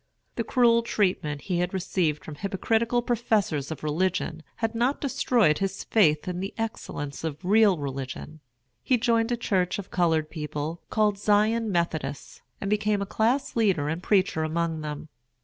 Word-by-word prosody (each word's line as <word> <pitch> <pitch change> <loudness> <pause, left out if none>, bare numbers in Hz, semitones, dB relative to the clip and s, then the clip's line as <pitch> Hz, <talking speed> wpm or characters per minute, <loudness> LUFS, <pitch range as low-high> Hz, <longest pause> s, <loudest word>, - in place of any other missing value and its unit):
The - - -1
cruel 235 -2 +4
treatment 180 -10 0
he 180 -3 -1
had 180 +2 -1
received 175 -5 -1
from 155 - -7
hypocritical 225 +7 0
professors 215 - 0
of 160 - -6
religion 165 +1 -1
had 225 0 -2
not 245 +5 +1
destroyed 235 - +2
his 195 0 -2
faith 155 -9 +3
in 180 -1 -3
the 195 +2 -5
excellence 145 -11 -5
of 160 +2 -5
real 205 -1 +5
religion. 140 +2 -6 0.4
He 255 - +2
joined 230 0 +1
a 240 - +1
church 185 -5 0
of 200 -2 -8
colored 160 -3 +1
people, 155 +1 -4
called 210 -2 +1
Zion 215 +2 +2
Methodists, 160 -5 -2 0.2
and 200 - -4
became 210 0 +1
a - - -4
class 235 +7 0
leader 190 -11 +2
and 165 +3 -3
preacher 185 -4 +2
among 160 0 -1
them. 150 0 -6
190 Hz, 160 wpm, -26 LUFS, 155-220 Hz, 0.4 s, real